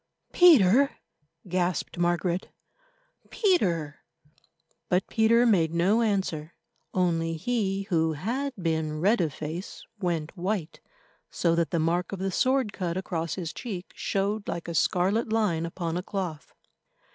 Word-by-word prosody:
"Peter!" 275 - +6 0.5
gasped 180 -2 -1
Margaret—"Peter!" 185 - -2 0.9
But 180 +1 +2
Peter 230 +2 +3
made 170 -8 +3
no 195 +7 +3
answer, 190 -8 -1 0.4
only 165 -3 0
he 195 0 -1
who 160 -5 +1
had 245 - -2
been 160 -3 -1
red 200 +5 +3
of 160 -3 0
face 160 +7 -7
went 170 -4 -2
white, 180 -3 -3 0.5
so 170 -2 +1
that 170 -1 +1
the 170 - -1
mark 170 +2 0
of 195 - -4
the 190 +1 -2
sword 255 0 +1
cut 175 -2 -3
across 170 -4 -3
his 170 -4 -5
cheek 190 -7 -6
showed 200 +2 -2
like 170 - -4
a 170 - -4
scarlet 190 +8 +1
line 185 -7 +1
upon 170 0 -3
a - - -1
cloth. 180 -6 -5
180 Hz, 130 wpm, -27 LUFS, 165-215 Hz, 0.9 s, Peter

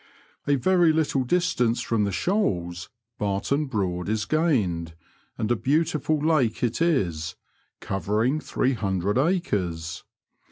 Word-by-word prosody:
A 145 - +4
very 175 +4 +4
little 155 -4 +1
distance 125 -6 +1
from 115 -4 0
the 100 - -1
Shoals, 90 - -1 0.3
Barton 105 +9 0
Broad 95 -7 -2
is 110 -1 0
gained, 100 - 0 0.4
and 110 +1 -1
a - - +4
beautiful 155 +3 +1
lake 150 -8 +1
it 120 +5 0
is, 85 - 0 0.5
covering 105 - 0
three 135 -3 0
hundred 100 0 0
acres. 95 - -1
115 Hz, 120 wpm, -25 LUFS, 95-155 Hz, 0.5 s, A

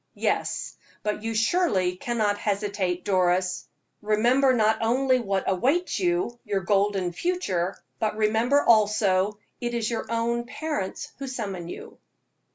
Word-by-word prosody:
"Yes, - - -1 0.3
but 210 0 -2
you 225 0 -3
surely 215 - +2
cannot 210 0 -1
hesitate, 200 -3 -1
Doris. 185 -1 +1 0.3
Remember 240 +6 +3
not 220 -3 +2
only 255 +3 +2
what 195 -4 -1
awaits 275 - +1
you 350 -9 0
your 205 -4 -1
golden 195 -1 +1
future 190 - -1 0.2
but 215 -1 -1
remember, 225 +6 +3
also, 210 -3 +3 0.2
it 240 0 -3
is 230 -1 -1
your 230 - -3
own 235 +1 -1
parents 295 -11 -4
who 275 - -5
summon 195 -9 -5
you." - - -9
215 Hz, 130 wpm, -26 LUFS, 195-240 Hz, 0.3 s, Remember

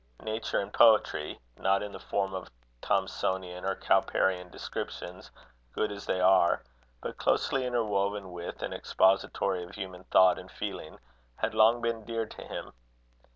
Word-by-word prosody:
Nature 110 +1 -1
in 100 - -4
poetry 110 -9 +4 0.2
not 95 +1 +2
in 105 - -6
the - - -8
form 95 -1 -2
of 95 -1 -5 0.3
Thomsonian 90 -1 -1
or 95 0 0
Cowperian 90 -1 +1
descriptions, 90 +1 -6 0.4
good 105 - 0
as 100 0 -8
they 95 - 0
are, 90 -2 +4 0.4
but - - -6
closely 130 -2 +1
interwoven 100 -5 -1
with 85 0 -6
and - - -3
expository 95 -1 +2
of 90 +2 -9
human 95 -1 -7
thought 95 -1 +5
and - - -11
feeling - - -6 0.4
had - - -2
long 110 +2 +5
been 115 -1 -1
dear 115 +1 -2
to - - -11
him. - - -7
95 Hz, 150 wpm, -29 LUFS, 90-110 Hz, 0.4 s, thought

